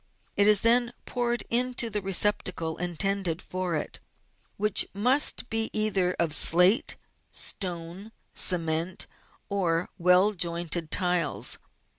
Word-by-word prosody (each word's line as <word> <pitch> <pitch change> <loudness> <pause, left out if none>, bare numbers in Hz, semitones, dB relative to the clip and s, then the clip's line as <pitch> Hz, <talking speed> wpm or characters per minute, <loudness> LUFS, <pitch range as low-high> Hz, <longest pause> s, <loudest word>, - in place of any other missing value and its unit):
It 205 - +3
is 210 -2 +5
then 240 +1 +3
poured 240 -1 -2
into 245 0 +1
the 210 0 -3
re 195 0 -5
ceptacle 180 -4 0
intended 180 0 -2
for 185 -3 -4
it, - - -5 0.6
which 210 -1 +2
must 250 +5 +3
be 225 0 -2
either 195 -4 0
of 165 -3 -1
slate, 180 - +4 0.3
stone, 180 +2 -3 0.2
cement, 165 0 0 0.4
or 175 -4 -2
well 180 +4 +3
jointed 170 -2 -2
tiles. 180 -4 +1
185 Hz, 115 wpm, -26 LUFS, 170-210 Hz, 0.6 s, is